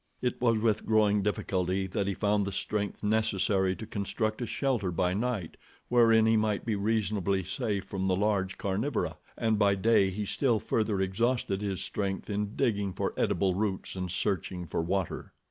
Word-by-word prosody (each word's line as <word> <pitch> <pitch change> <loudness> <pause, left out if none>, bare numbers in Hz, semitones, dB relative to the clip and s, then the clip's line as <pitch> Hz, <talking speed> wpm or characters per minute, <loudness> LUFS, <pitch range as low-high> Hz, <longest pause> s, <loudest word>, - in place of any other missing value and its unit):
It 125 -1 -2
was 115 -2 +3
with 110 -1 0
growing 105 -2 +3
difficulty 95 -2 -1
that 95 +1 -2
he 100 - -1
found 105 -1 +1
the - - -2
strength 100 +2 -3
necessary 100 -3 +1
to 110 - -7
construct 110 +2 -2
a 120 - -2
shelter 125 -9 0
by 90 +1 +1
night 105 -5 -2 0.3
wherein 115 -2 +5
he 110 0 +4
might 110 -2 0
be 110 -2 0
reasonably 100 -2 0
safe 100 +1 -2
from 95 -1 -3
the 95 - +2
large 95 -1 0
carnivora, 105 +7 -1 0.2
and 110 -2 +1
by 100 -1 +4
day 100 -1 +3
he 105 +2 -3
still 120 +1 +1
further 110 -1 0
exhausted 100 +1 0
his 100 -3 -2
strength 100 0 -3
in 105 0 -2
digging 105 -7 0
for - - -2
edible 95 -2 +1
roots, 95 -1 -2
and 90 -1 -3
searching 90 -1 -2
for 80 - -2
water. 90 +1 -2
100 Hz, 175 wpm, -29 LUFS, 95-110 Hz, 0.3 s, wherein